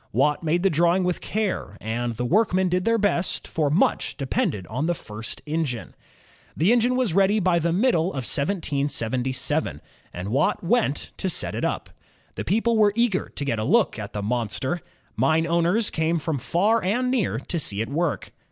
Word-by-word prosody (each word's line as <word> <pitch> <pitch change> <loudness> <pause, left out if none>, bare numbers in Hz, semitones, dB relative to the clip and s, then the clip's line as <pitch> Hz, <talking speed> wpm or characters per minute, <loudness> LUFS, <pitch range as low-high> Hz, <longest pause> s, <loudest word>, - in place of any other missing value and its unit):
Watt 150 0 +2
made 170 +2 0
the 195 - +3
drawing 170 +4 +3
with 180 -1 -1
care, 205 - -2
and 120 +2 -2
the 125 +2 -2
workmen 185 - +2
did 180 +1 0
their 230 0 +3
best, 195 -4 0
for 155 -3 0
much 160 +7 +1
depended 110 - -1
on 130 - -2
the 175 - +1
first 110 -5 -8
engine. 150 -6 -3 0.6
The 175 +8 +3
engine 245 +1 +3
was 250 -9 +1
ready 195 +3 +4
by 180 -3 +2
the 170 +1 0
middle 180 -3 +2
of 135 -9 -4
1777, 140 - -1 0.3
and 90 +3 -5
Watt 130 +6 +1
went 175 - +1
to 190 - -1
set 180 - -2
it - - -3
up. - - -2 0.4
The - - -4
people 225 +2 +1
were 210 -2 +4
eager 235 -5 +1
to 140 - -5
get 115 -5 -1
a - - -1
look 200 - +2
at 105 -1 -6
the 105 - -3
monster. 120 - -1 0.3
Mine 160 +1 +2
owners 170 +6 +2
came 160 +1 +1
from 155 -2 -2
far 210 - +1
and 245 +7 +1
near 220 - 0
to 165 +7 -3
see 100 -9 -2
it 110 - -1
work. 160 +1 -1
165 Hz, 185 wpm, -24 LUFS, 135-195 Hz, 0.6 s, ready